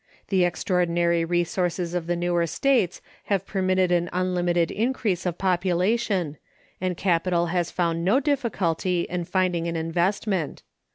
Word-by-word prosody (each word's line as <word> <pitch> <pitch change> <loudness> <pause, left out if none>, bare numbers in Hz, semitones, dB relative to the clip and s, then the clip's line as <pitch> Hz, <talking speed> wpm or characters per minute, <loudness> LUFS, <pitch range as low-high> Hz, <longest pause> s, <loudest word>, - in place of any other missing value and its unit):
The 185 -3 +3
extraordinary 175 -1 +1
resources 175 0 -1
of 175 -2 -2
the 175 - +1
newer 175 -1 0
States 195 - +1 0.2
have 195 -2 0
permitted 185 -2 +1
an 175 0 +1
unlimited 175 -2 +1
increase 215 -5 -1
of 175 -1 -2
population, 185 -1 0 0.4
and 185 -2 -1
capital 175 -1 +1
has 175 -2 0
found 170 -2 -1
no 200 +9 +4
difficulty 195 - 0
in 175 0 -3
finding 180 -2 0
an 170 - -2
investment. 175 +1 -1
180 Hz, 130 wpm, -25 LUFS, 170-190 Hz, 0.4 s, no